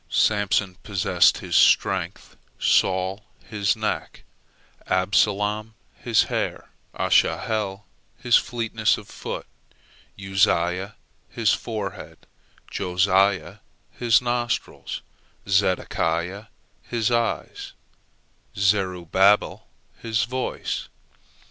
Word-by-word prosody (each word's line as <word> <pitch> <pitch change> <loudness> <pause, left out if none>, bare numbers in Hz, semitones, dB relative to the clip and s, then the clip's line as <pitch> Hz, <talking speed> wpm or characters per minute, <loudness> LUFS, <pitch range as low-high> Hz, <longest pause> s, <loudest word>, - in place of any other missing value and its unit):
Samson 100 -3 +1
possessed 95 -3 +2
his - - -4
strength, - - +2 0.2
Saul 95 +2 +1 0.2
his 100 -5 0
neck, - - -4 0.6
Absalom 105 +3 +1 0.2
his 115 -2 +2
hair, - - -3 0.3
Asahel 105 -2 +1 0.3
his 120 -1 +2
fleetness 115 -2 +1
of 105 - -11
foot, - - -6 0.7
Uzziah 95 0 +1 0.3
his - - +1
forehead, 105 -5 -6 0.5
Josiah 95 +1 +1 0.3
his 120 0 +2
nostrils, 120 -1 -3 0.4
Zedekiah 95 0 0 0.4
his 120 -1 -1
eyes, 115 -1 -2 0.8
and 100 - -2
Zerubbabel 95 0 +2 0.3
his 110 -2 0
voice. 130 +3 -3
100 Hz, 80 wpm, -24 LUFS, 95-110 Hz, 0.8 s, possessed